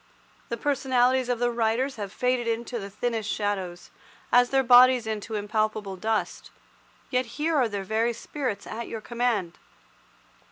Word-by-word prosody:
The 235 - -2
personalities 260 -1 +1
of 245 - +1
the 240 +1 +1
writers 235 +3 0
have 200 -2 -5
faded 250 +2 0
into 235 +1 -2
the 200 -1 -7
thinnest 220 0 -2
shadows, 190 -5 -3 0.4
as 245 0 +5
their 270 0 +2
bodies 250 0 +7
into 220 0 -4
impalpable 210 -1 -1
dust, 220 +3 -2 0.6
yet 255 -1 +1
here 315 +2 0
are 255 -5 +3
their 200 -2 -4
very 225 +4 0
spirits 245 -2 -4
at 230 +1 -6
your 225 - -6
command. 235 -7 -1
235 Hz, 150 wpm, -26 LUFS, 210-250 Hz, 0.6 s, bodies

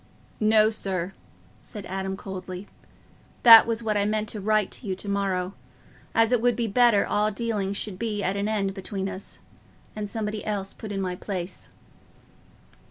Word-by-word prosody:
"No, 215 0 +5
sir," 190 -3 -3 0.5
said 210 -3 -8
Adam, 190 +1 -3
coldly, 185 -1 -7 0.8
"that 230 -2 +10
was 230 0 -1
what 215 -1 0
I 205 - +2
meant 215 +1 -1
to 210 - -5
write 215 0 +1
to 230 - -8
you 190 - -1
to 190 - -7
morrow, 195 -2 -1 0.6
as 225 +1 +4
it 245 -3 +3
would 245 0 +3
be 235 - -1
better 230 -1 +4
all 210 +1 +2
dealings 205 -2 -2
should 195 -3 -4
be 215 -3 -2
at 190 +1 0
an 200 +1 -1
end 200 -3 0
between 195 0 -4
us, 195 0 -8 0.6
and 210 -1 -4
somebody 210 0 -3
else 200 -2 -3
put 215 - -8
in 195 -1 -2
my 180 -1 -2
place." 180 -1 -6
205 Hz, 170 wpm, -26 LUFS, 195-215 Hz, 0.8 s, that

